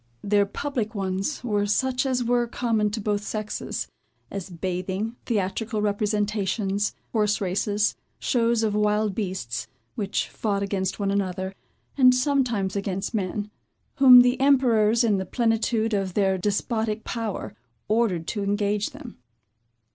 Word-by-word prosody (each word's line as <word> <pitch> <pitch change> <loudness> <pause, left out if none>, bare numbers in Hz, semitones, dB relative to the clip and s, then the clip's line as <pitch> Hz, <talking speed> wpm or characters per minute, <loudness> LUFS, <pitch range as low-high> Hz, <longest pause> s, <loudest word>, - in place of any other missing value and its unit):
Their 205 0 +3
public 235 -1 -3
ones, 195 +8 -2
were 205 -4 0
such 255 +5 +1
as 250 -2 0
were 240 0 +1
common 225 -3 0
to 215 +2 -4
both 205 -1 -1
sexes; 215 0 -4 0.4
as 195 -1 -5
bathing, 185 +5 -3
theatrical 215 +1 -1
representations, 205 -1 0 0.2
horse 210 -2 +1
races, 205 +2 0 0.2
shows 235 -2 +1
of 215 -2 +1
wild 210 0 +1
beasts, 185 - -3 0.3
which 205 -5 -2
fought 200 -2 -2
against 190 -1 -2
one 200 -1 0
another, 190 -1 -2 0.5
and 255 -1 +7
sometimes 250 -8 +1
against 195 +1 -2
men, 205 0 -2 0.5
whom 255 -2 +10
the 245 0 +2
emperors, 235 -5 +4
in 215 -4 +3
the - - -1
plenitude 225 0 +1
of 195 -3 -1
their 195 -2 +3
despotic 215 +3 -1
power, 225 -4 -4 0.3
ordered 215 -7 +1
to 210 - -2
engage 205 +1 0
them. - - -11
210 Hz, 130 wpm, -25 LUFS, 195-230 Hz, 0.5 s, whom